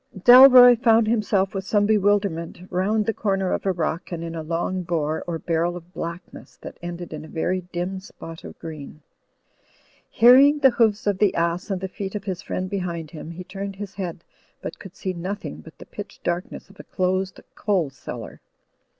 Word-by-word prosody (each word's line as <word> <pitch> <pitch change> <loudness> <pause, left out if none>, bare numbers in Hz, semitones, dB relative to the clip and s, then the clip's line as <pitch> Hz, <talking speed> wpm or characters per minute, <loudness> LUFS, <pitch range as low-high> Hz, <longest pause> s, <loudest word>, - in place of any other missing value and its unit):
Dalroy 245 +3 +9
foimd 225 -1 +4
himself, 210 -4 +1
with 195 -1 -3
some 205 +1 +2
bewilderment, 200 -5 +1
round 205 +4 +1
the 225 - 0
comer 195 -4 -1
of - - -2
a - - +3
rock 170 0 -3
and 170 -1 -4
in 165 0 -5
a 165 - -4
long 170 +3 -2
bore 160 -3 -2
or 170 -1 -2
barrel 170 +2 -1
of 175 +1 -14
blackness 170 +1 -8
that - - -9
ended 175 -1 -7
in 155 0 -7
a - - -10
very 180 +4 -2
dim 180 +2 -3
spot 165 -3 -11
of - - -10
green. 155 -2 -9 1.1
Hearing 265 +5 +6
the 270 -3 +5
hoofs 220 -3 +1
of 200 -2 0
the 205 -3 +3
ass 170 +3 -1
and 190 -2 -2
the 190 - -2
feet 195 +1 -6
of 205 - -4
his 190 -3 -4
friend 185 -2 -4
behind 170 -5 -4
him, 155 -1 -8
he 170 +2 -8
turned 195 +1 -6
his 200 -1 -7
head, 175 -4 -6 0.4
but - - -7
could 195 -2 -12
see 185 - -4
nothing 180 - -5
but 80 - -14
the - - -12
pitch - - -9
darkness 175 +1 -3
of 195 - -22
a - - -8
closed 185 +1 -2
coal 185 -9 0
cellar. 135 - -9
185 Hz, 195 wpm, -23 LUFS, 170-205 Hz, 1.1 s, Dalroy